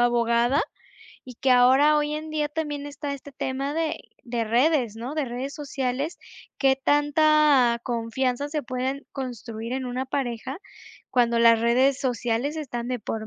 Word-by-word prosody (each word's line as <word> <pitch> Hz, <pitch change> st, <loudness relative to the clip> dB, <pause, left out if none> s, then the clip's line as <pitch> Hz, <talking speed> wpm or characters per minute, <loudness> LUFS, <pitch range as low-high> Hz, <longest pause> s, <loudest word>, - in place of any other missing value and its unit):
abogada 240 Hz, +3 st, +3 dB, 0.6 s
y 250 Hz, -2 st, -10 dB
que 265 Hz, -, 0 dB
ahora 260 Hz, +5 st, +6 dB
hoy 295 Hz, 0 st, -1 dB
en 310 Hz, +1 st, -5 dB
día 300 Hz, -1 st, -1 dB
también 295 Hz, -2 st, -4 dB
está 285 Hz, 0 st, -5 dB
este 280 Hz, 0 st, -9 dB
tema 270 Hz, +2 st, -3 dB
de 325 Hz, -1 st, -1 dB, 0.3 s
de 235 Hz, -1 st, -2 dB
redes, 240 Hz, -1 st, +2 dB
¿no?, 245 Hz, +6 st, -5 dB
de 305 Hz, -3 st, -1 dB
redes 255 Hz, +3 st, -5 dB
sociales. 275 Hz, +1 st, -3 dB, 0.4 s
¿Qué 270 Hz, -1 st, +3 dB
tanta 290 Hz, -3 st, +4 dB
confianza 250 Hz, +3 st, -1 dB
se 300 Hz, 0 st, -2 dB
pueden 260 Hz, +3 st, -3 dB
construir 235 Hz, -3 st, -6 dB
en 265 Hz, -1 st, -3 dB
una 255 Hz, +1 st, -3 dB
pareja 260 Hz, +2 st, -3 dB, 0.5 s
cuando 235 Hz, -2 st, +2 dB
las 230 Hz, -1 st, +6 dB
redes 255 Hz, +4 st, +3 dB
sociales 245 Hz, +3 st, -1 dB
están 240 Hz, -6 st, -4 dB
de 250 Hz, -1 st, -2 dB
por 215 Hz, +1 st, -5 dB
260 Hz, 155 wpm, -25 LUFS, 240-290 Hz, 0.6 s, ahora